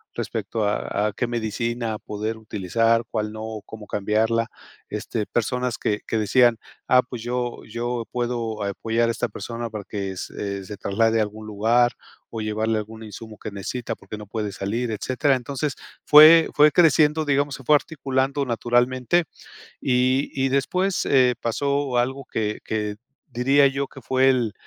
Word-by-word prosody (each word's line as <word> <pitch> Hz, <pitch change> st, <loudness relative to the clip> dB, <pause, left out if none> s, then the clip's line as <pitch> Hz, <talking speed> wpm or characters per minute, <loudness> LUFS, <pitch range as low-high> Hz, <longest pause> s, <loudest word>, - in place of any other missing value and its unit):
respecto 110 Hz, +1 st, -3 dB
a 105 Hz, 0 st, 0 dB
a 105 Hz, -, -3 dB
qué 125 Hz, -, -1 dB
medicina 115 Hz, 0 st, -2 dB
poder 105 Hz, +2 st, -4 dB
utilizar, 110 Hz, +2 st, +1 dB
cuál 105 Hz, -1 st, -2 dB
no, 110 Hz, 0 st, -6 dB
cómo 110 Hz, -1 st, -10 dB
cambiarla, 110 Hz, +3 st, +1 dB, 0.4 s
este, 105 Hz, +1 st, -3 dB
personas 125 Hz, +2 st, -1 dB
que 105 Hz, 0 st, -1 dB
que 115 Hz, -, -1 dB
decían: 120 Hz, +2 st, +4 dB, 0.3 s
"Ah, 125 Hz, -, +6 dB
pues, 125 Hz, -2 st, -8 dB
yo 120 Hz, 0 st, -3 dB
yo 120 Hz, +1 st, -3 dB
puedo 120 Hz, -3 st, -2 dB
apoyar 115 Hz, +3 st, 0 dB
a -, -, +3 dB
esta 115 Hz, -, -2 dB
persona 115 Hz, -1 st, -6 dB
para 105 Hz, -2 st, -5 dB
que 100 Hz, -2 st, -4 dB
se 100 Hz, +1 st, -5 dB
se 105 Hz, +1 st, -8 dB
traslade 115 Hz, +3 st, +1 dB
a -, -, +4 dB
algún 105 Hz, +1 st, -7 dB
lugar, 115 Hz, +4 st, +2 dB, 0.4 s
o 115 Hz, -, -5 dB
llevarle 110 Hz, +1 st, 0 dB
algún 110 Hz, +1 st, -6 dB
insumo 110 Hz, 0 st, -10 dB
que -, -, -6 dB
necesita, 105 Hz, +5 st, -4 dB
porque 110 Hz, -, -9 dB
no 105 Hz, -, -10 dB
puede 105 Hz, -1 st, -3 dB
salir", 110 Hz, +5 st, -2 dB
etcétera. 130 Hz, +5 st, +1 dB
Entonces, 135 Hz, +3 st, -3 dB, 0.3 s
fue 155 Hz, +2 st, +9 dB
fue 150 Hz, 0 st, +6 dB
creciendo, 155 Hz, -2 st, +4 dB
digamos, 145 Hz, 0 st, +1 dB
se 135 Hz, -, -12 dB
fue 150 Hz, -, +4 dB
articulando 140 Hz, -2 st, -1 dB
naturalmente, 125 Hz, +6 st, +1 dB, 0.6 s
y 130 Hz, +2 st, +1 dB
y 135 Hz, 0 st, 0 dB
después, 180 Hz, +8 st, 0 dB
eh, 130 Hz, -3 st, +4 dB
pasó 140 Hz, +1 st, 0 dB
algo 130 Hz, +2 st, -2 dB
que 105 Hz, -3 st, -3 dB
que 105 Hz, -1 st, -2 dB, 0.3 s
diría 135 Hz, +3 st, +4 dB
yo 135 Hz, +1 st, -2 dB
que 135 Hz, -, -13 dB
fue 130 Hz, +2 st, +3 dB
el, 120 Hz, -5 st, 0 dB
115 Hz, 160 wpm, -23 LUFS, 110-130 Hz, 0.6 s, fue